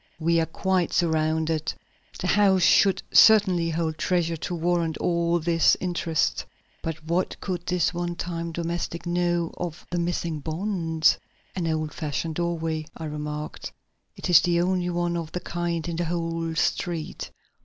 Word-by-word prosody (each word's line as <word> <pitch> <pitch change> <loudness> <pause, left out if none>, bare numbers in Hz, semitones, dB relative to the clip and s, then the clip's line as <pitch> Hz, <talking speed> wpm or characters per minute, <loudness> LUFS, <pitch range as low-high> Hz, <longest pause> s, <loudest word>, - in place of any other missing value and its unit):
"We 170 +1 +2
are 160 - +1
quite 185 +1 0
surrounded. 160 -1 +1 0.5
The - - -3
house 190 -1 +4
should 195 +2 +4
certainly 190 -6 +6
hold 160 -1 -2
treasure 170 -2 +1
to 175 - -4
warrant 170 -1 0
all 170 -1 +1
this 165 0 +3
interest. 170 -3 0 0.4
But 160 -1 -5
what 170 +3 -1
could 175 -3 -4
this 180 -1 +1
one 175 0 -3
time 170 -1 -4
domestic 170 0 -3
know 175 -1 0
of 175 -2 -5
the 175 - 0
missing 170 -2 -2
bonds?" 165 0 +1 0.4
"An 175 -3 -1
old 155 -1 -1
fashioned 155 +1 -3
doorway," 165 -2 -2
I 160 - -6
remarked. 150 0 -5 0.4
"It - - -5
is 175 -3 +7
the 170 -1 +2
only 180 0 +1
one 175 0 -1
of 165 -2 -4
the 180 - -2
kind 175 -2 -3
on 170 -1 -3
the 175 - 0
whole 165 -1 -2
street. 165 -1 -2
170 Hz, 155 wpm, -25 LUFS, 160-175 Hz, 0.5 s, is